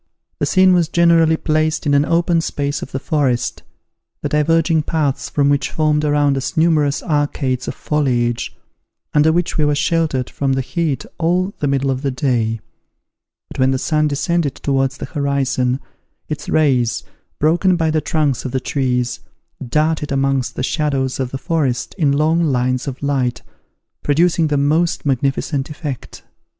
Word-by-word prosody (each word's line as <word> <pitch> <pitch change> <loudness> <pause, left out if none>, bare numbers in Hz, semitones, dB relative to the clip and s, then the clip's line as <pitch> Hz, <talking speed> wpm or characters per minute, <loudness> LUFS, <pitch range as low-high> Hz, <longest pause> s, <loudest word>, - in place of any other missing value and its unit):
The - - 0
scene 185 -1 +5
was 170 -3 +2
generally 165 -2 +4
placed 155 0 0
in 145 - +2
an 140 +1 +4
open 170 0 +2
space 145 -2 -2
of - - -7
the - - -2
forest, 135 -4 -1 0.6
the - - -1
diverging 160 +1 +2
paths 150 -3 -1
from 140 -1 +1
which 145 0 +1
formed 155 -1 +1
around 145 -1 +2
us 130 +2 -4
numerous 155 -3 +2
arcades 145 -5 -1
of - - -4
foliage, 120 -6 -1 0.6
under 150 +1 +4
which 170 0 -1
we 150 - +3
were 145 0 +2
sheltered 150 -4 0
from 135 -1 -1
the 135 - 0
heat 155 0 -2
all 180 +4 +1
the 145 - 0
middle 135 0 +1
of 130 0 -3
the 140 - 0
day; 120 -4 0 0.9
but - - -9
when 130 0 +4
the 135 - +1
sun 155 +3 +1
descended 150 +1 0
towards 135 -1 -1
the - - -5
horizon, 135 -3 0 0.5
its 150 -1 -5
rays, 125 -7 +2 0.3
broken 175 +5 +3
by 160 -2 +1
the 155 0 +1
trunks 150 -4 0
of 130 - -4
the 130 - 0
trees, 125 -2 -1 0.4
darted 150 +3 0
amongst 135 -2 0
the - - -3
shadows 135 -3 -1
of 130 -2 -1
the 135 - -4
forest 135 -4 -1
in 150 -4 +3
long 155 +4 +2
lines 130 -2 0
of 135 0 -6
light, 130 -4 -1 0.6
producing 165 +2 +2
the 150 -1 0
most 155 +5 +1
magnificent 135 +1 -1
effect. 145 -4 -7
145 Hz, 160 wpm, -18 LUFS, 135-160 Hz, 0.9 s, scene